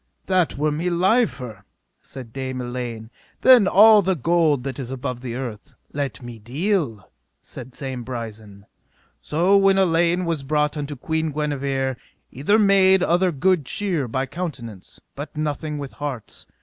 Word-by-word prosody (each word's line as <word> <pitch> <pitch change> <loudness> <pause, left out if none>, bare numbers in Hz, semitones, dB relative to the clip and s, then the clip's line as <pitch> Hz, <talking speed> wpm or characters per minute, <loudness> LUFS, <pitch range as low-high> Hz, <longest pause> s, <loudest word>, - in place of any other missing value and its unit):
That 185 -6 +1
were 150 +1 +1
me 165 +4 -1
liefer, 170 - 0 0.4
said 125 -4 -11
Dame 130 -1 -4
Elaine, 120 -2 -6 0.3
than 250 -6 +7
all 210 +2 +7
the 190 0 0
gold 155 -2 +2
that 135 -1 -5
is 125 -3 -5
above 130 -2 -5
the 120 -2 -5
earth. 120 -5 -7 0.2
Let 140 -4 -4
me 120 -2 -9
deal, 135 - -2 0.4
said 130 -1 -10
Dame 130 -2 -5
Brisen. 110 -5 -8 0.6
So 175 +6 +2
when 195 0 +4
Elaine 175 -1 +2
was 165 -4 -2
brought 150 +2 0
unto 145 -1 -4
Queen 160 +4 -2
Guenever 140 -3 -2 0.3
either 150 - +2
made 190 -3 +5
other 180 +1 +2
good 175 +2 +1
cheer 170 -2 -2
by 130 +3 -2
countenance, 130 - -7
but 145 +2 -8
nothing 150 0 -3
with 140 -2 -6
hearts. 140 -6 -7
145 Hz, 150 wpm, -22 LUFS, 125-175 Hz, 0.6 s, than